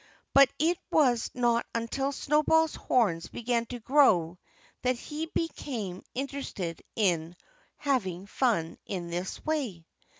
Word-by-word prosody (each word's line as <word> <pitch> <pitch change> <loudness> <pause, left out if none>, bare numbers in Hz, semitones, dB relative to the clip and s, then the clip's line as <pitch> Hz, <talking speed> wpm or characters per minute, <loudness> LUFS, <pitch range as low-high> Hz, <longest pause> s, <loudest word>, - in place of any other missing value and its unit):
But 275 -2 +8
it 330 +3 +2
was 250 -7 +3
not 240 -1 +2
until 250 +4 -1
Snowball's 305 +3 +3
horns 185 -10 +1
began 235 0 -1
to 245 +1 -6
grow 215 - +4 0.4
that 255 0 +2
he 305 +5 -5
became 240 - -3
interested 255 - -4
in 175 -5 +1 0.4
having 195 - -1
fun 205 -7 0
in 175 -3 -4
this 180 +2 -4
way. 255 - -2
240 Hz, 120 wpm, -29 LUFS, 185-280 Hz, 0.4 s, But